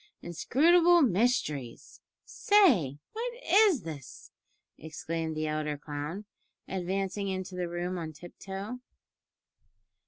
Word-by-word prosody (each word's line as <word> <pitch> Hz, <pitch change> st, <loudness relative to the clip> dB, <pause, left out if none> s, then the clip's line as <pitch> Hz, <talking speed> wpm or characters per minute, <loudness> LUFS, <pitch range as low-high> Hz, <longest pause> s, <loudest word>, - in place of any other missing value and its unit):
"Inscrutable 335 Hz, -, +4 dB
mysteries! 175 Hz, -, -1 dB, 0.2 s
say, 250 Hz, -, +3 dB, 0.2 s
what 475 Hz, +2 st, -3 dB
is 395 Hz, -, +5 dB
this?" 150 Hz, -5 st, -9 dB, 0.4 s
exclaimed 160 Hz, 0 st, -5 dB
the 155 Hz, -, -1 dB
elder 155 Hz, -1 st, -2 dB
clown, 150 Hz, +7 st, -6 dB, 0.4 s
advancing 195 Hz, +2 st, -2 dB
into 190 Hz, -1 st, -4 dB
the 180 Hz, -1 st, -3 dB
room 175 Hz, +1 st, -3 dB
on 160 Hz, -1 st, -5 dB
tiptoe. 195 Hz, +8 st, -8 dB
180 Hz, 95 wpm, -29 LUFS, 155-245 Hz, 0.4 s, is